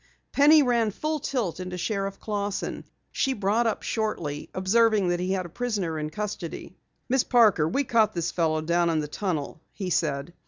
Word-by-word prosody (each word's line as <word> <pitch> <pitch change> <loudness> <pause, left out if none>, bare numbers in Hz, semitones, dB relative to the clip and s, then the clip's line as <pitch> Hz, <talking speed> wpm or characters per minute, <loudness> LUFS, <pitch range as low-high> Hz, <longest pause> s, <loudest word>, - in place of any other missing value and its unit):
Penny 295 +2 +6
ran 235 -4 +2
full 305 +9 -2
tilt 240 - -2
into 180 0 -5
Sheriff 195 +1 -2
Clausson. 205 -1 -3 0.3
She 270 - 0
brought 215 +2 +1
up 220 - -2
shortly, 170 -10 -3
observing 205 +1 +2
that 175 0 0
he 185 +1 -1
had 185 -2 -2
a - - -5
prisoner 195 -7 -2
in 150 0 -3
custody. 205 -2 -6 0.3
"Miss 260 0 +2
Parker, 215 -11 +4
we 275 +11 +1
caught 230 -5 +2
this 170 0 -1
fellow 160 -2 0
down 170 +2 +1
in 165 - +1
the 150 -1 -1
tunnel," 155 -3 -3
he 190 -3 -5
said. 150 0 -1
195 Hz, 180 wpm, -26 LUFS, 170-230 Hz, 0.3 s, Penny